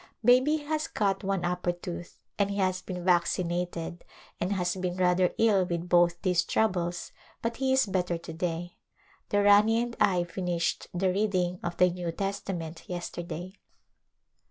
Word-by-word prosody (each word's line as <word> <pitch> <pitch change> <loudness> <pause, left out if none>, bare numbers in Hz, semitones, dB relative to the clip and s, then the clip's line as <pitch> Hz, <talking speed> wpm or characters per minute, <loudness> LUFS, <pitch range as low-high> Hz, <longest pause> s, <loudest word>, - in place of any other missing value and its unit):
Baby 255 +6 +5
has 305 +1 -2
cut 195 -2 0
one 195 -2 -1
upper 180 0 0
tooth 175 0 -7 0.2
and 200 -1 +2
he 200 - -3
has 185 -1 +1
been 180 -2 -6
vacci 180 0 +3
nated 175 0 -3 0.4
and 180 - -1
has 180 -2 0
been 180 -1 -3
rather 180 0 +3
ill 210 -4 +4
with 170 -1 -3
both 175 -1 +4
these 180 -3 +3
troubles 175 -5 0 0.3
but 230 0 -2
he 265 -1 +1
is 265 0 +4
better 180 -3 -1
to 165 0 -9
day. 170 +1 -3 0.5
The 205 0 +2
Rani 210 +3 +6
and 240 0 -2
I 180 -2 +3
finished 175 -1 -2
the 180 +1 +1
reading 185 -3 0
of 175 0 -4
the 180 0 +5
New 175 -1 -3
Testament 180 -4 -4
yesterday. 175 +1 -6
180 Hz, 160 wpm, -28 LUFS, 175-200 Hz, 0.5 s, Rani